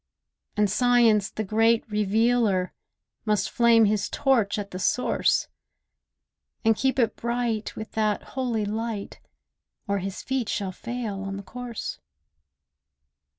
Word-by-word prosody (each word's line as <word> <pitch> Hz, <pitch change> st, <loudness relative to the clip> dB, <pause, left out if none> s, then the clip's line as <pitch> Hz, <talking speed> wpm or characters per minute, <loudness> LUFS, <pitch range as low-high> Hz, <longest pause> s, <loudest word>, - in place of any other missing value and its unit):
And 210 Hz, 0 st, +4 dB
Science, 230 Hz, -2 st, +3 dB
the 215 Hz, -, -4 dB
great 225 Hz, +3 st, +2 dB
revealer, 210 Hz, -2 st, +1 dB, 0.5 s
Must 210 Hz, -2 st, 0 dB
flame 235 Hz, -1 st, +5 dB
his 210 Hz, 0 st, 0 dB
torch 235 Hz, -7 st, +2 dB
at 200 Hz, -1 st, -5 dB
the 185 Hz, -, -5 dB
Source; 250 Hz, +6 st, +1 dB, 1.2 s
And 225 Hz, 0 st, +5 dB
keep 265 Hz, +4 st, 0 dB
it 235 Hz, -3 st, +2 dB
bright 235 Hz, -2 st, -2 dB
with 220 Hz, -, -7 dB
that 215 Hz, -2 st, 0 dB
holy 240 Hz, -5 st, -1 dB
light, 220 Hz, 0 st, -4 dB, 0.7 s
Or 200 Hz, 0 st, 0 dB
his 195 Hz, +1 st, -5 dB
feet 265 Hz, -4 st, -2 dB
shall 195 Hz, -2 st, -2 dB
fail 230 Hz, -1 st, -5 dB
on 195 Hz, 0 st, -4 dB
the 200 Hz, -, -7 dB
course. 245 Hz, +2 st, -6 dB
220 Hz, 125 wpm, -25 LUFS, 205-235 Hz, 1.2 s, flame